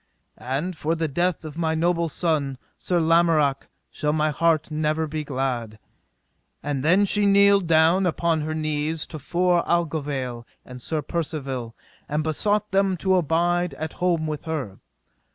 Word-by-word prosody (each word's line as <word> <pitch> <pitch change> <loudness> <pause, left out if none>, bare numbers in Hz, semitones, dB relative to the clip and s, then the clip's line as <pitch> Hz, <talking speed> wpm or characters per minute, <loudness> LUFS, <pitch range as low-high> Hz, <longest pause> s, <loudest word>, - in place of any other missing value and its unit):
And 145 +9 -3
for 160 +2 -1
the 165 -1 -1
death 175 +3 -1
of 155 +1 -7
my 160 -1 0
noble 170 0 +1
son, 150 -5 -1 0.2
Sir 175 -1 0
Lamorak, 160 -4 +2 0.2
shall 150 - -1
my 155 0 +1
heart 160 0 +1
never 155 +1 0
be 155 0 -4
glad. 130 -6 -3 0.9
And 145 -2 -2
then 185 +6 +4
she 205 +1 +2
kneeled 200 -2 +5
down 165 +4 +4
upon 165 -1 0
her 155 +1 -3
knees 155 0 -2
to 155 - -8
fore 175 +3 +1
Aglovale 145 -8 -2 0.2
and 125 -1 -10
Sir 155 +3 -3
Percivale, 135 -7 -4 0.3
and 150 +1 0
besought 205 +7 0
them 195 -1 +2
to 190 +2 +2
abide 175 -1 +1
at 160 +2 -5
home 175 -3 0
with 155 -1 -4
her. 140 -12 -4
160 Hz, 155 wpm, -24 LUFS, 145-175 Hz, 0.9 s, kneeled